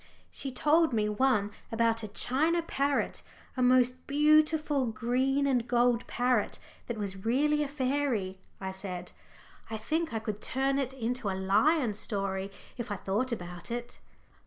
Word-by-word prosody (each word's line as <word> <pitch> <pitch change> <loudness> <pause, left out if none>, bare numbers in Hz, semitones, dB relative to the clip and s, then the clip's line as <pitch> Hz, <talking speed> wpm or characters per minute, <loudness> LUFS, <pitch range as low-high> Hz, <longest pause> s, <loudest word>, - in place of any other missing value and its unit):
"She 270 - -5
told 305 +3 +3
me 215 -2 +2
one 210 -2 +2 0.2
about 230 0 +2
a 215 - -5
china 310 +11 +1
parrot, 280 -3 0 0.3
a 255 - -1
most 250 0 +3
beautiful 300 -1 +3
green 255 +5 +1
and 250 -4 +1
gold 240 -1 +2
parrot, 245 -3 +1 0.3
that 235 - -3
was 195 -2 -4
really 295 +6 +2
a 295 - 0
fairy," 260 -9 -1 0.2
I 190 0 -4
said. 185 -2 -6 0.6
"I 220 - -3
think 315 +9 -1
I 225 - -1
could 215 -1 -4
turn 270 +2 0
it 265 -1 -2
into 245 -3 -2
a 190 - -2
lion 220 +7 +3
story, 195 -2 -2 0.3
if 240 -1 -5
I 205 - -1
thought 205 +7 -1
about 175 -5 -6
it." 240 0 -5
245 Hz, 155 wpm, -30 LUFS, 210-275 Hz, 0.6 s, told